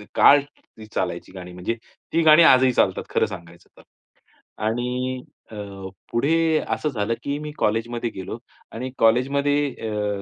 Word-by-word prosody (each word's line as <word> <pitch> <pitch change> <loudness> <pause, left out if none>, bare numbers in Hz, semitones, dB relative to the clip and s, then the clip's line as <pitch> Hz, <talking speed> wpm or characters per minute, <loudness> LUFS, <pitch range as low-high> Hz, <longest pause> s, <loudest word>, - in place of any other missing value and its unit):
काळ 145 0 +7
ती 140 -6 -17
चालायची 90 -1 -3
गाणी. 90 -1 -9
म्हणजे 90 +6 -3 0.4
ती 165 - +3
गाणी 155 +2 +8
आजही 130 -3 +6
चालतात - - +1
खरं - - +2
सांगायचं 85 0 -11
तर. - - -17 0.8
आणि 125 +2 -2 0.3
अ, 110 - -9 0.6
पुढे 160 +5 +2
असं 150 - -1
झालं 115 -4 -1
की 140 +1 -2
मी 150 0 -6
कॉलेजमध्ये 115 +2 -1
गेलो 95 +4 -6 0.3
आणि 125 +3 -5
कॉलेजमध्ये 140 +4 +2 0.2
अ, 105 -1 -2
120 Hz, 140 wpm, -23 LUFS, 105-145 Hz, 0.8 s, गाणी